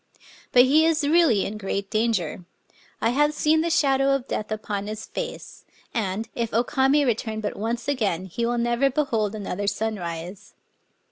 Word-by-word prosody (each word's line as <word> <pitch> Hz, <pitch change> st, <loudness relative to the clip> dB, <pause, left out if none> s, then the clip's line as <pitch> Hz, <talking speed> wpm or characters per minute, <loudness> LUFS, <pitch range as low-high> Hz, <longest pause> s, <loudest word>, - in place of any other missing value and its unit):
But 245 Hz, -, +7 dB
he 290 Hz, +5 st, +4 dB
is 320 Hz, -1 st, +2 dB
really 305 Hz, -, +4 dB
in 210 Hz, +1 st, -5 dB
great 195 Hz, 0 st, -3 dB
danger. 215 Hz, -7 st, 0 dB, 0.6 s
I 230 Hz, -, +2 dB
have 295 Hz, +3 st, +2 dB
seen 315 Hz, +1 st, +3 dB
the 335 Hz, -, 0 dB
shadow 275 Hz, -3 st, +3 dB
of 270 Hz, -1 st, -4 dB
death 215 Hz, -, -3 dB
upon 210 Hz, -2 st, -3 dB
his 215 Hz, 0 st, -5 dB
fece; -, -, -7 dB, 0.3 s
and, 215 Hz, -1 st, -2 dB
if 230 Hz, -1 st, -2 dB
O 235 Hz, -, +4 dB
Kamc 275 Hz, +2 st, +2 dB
return 220 Hz, -2 st, -1 dB
but 210 Hz, -1 st, -3 dB
once 230 Hz, +3 st, -3 dB
again, 205 Hz, -11 st, 0 dB
he 190 Hz, +6 st, -4 dB
will 240 Hz, +1 st, 0 dB
never 240 Hz, +3 st, +2 dB
behold 230 Hz, -7 st, 0 dB
another 200 Hz, -1 st, -4 dB
sunrise. 185 Hz, -4 st, -4 dB
230 Hz, 165 wpm, -24 LUFS, 205-275 Hz, 0.6 s, But